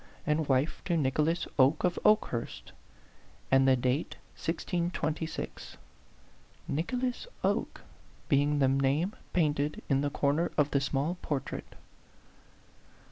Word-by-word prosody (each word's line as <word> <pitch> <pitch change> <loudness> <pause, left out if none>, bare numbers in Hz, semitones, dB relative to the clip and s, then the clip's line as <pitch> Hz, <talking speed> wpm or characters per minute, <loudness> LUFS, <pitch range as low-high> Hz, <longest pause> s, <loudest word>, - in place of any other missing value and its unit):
and 150 0 0
wife 135 +4 +1
to 170 -3 0
Nicholas 150 +4 +1
Oke 135 +4 +4
of 180 -1 +1
Oke 215 0 +4
hurst,"and 130 - -3
the 130 - +6
date 130 +4 -1 0.2
1626 165 -1 -3 0.9
"Nicholas 250 - -2 0.2
Oke" - - 0 0.5
being 145 +1 +3
the 135 -2 +4
name 135 +8 +1 0.2
painted 150 -3 0
in 135 -1 +3
the 145 - 0
corner 145 +5 +1
of 145 -1 +3
the 140 - +2
small 145 +6 -1
portrait. 145 -3 -4
150 Hz, 110 wpm, -30 LUFS, 135-165 Hz, 0.9 s, the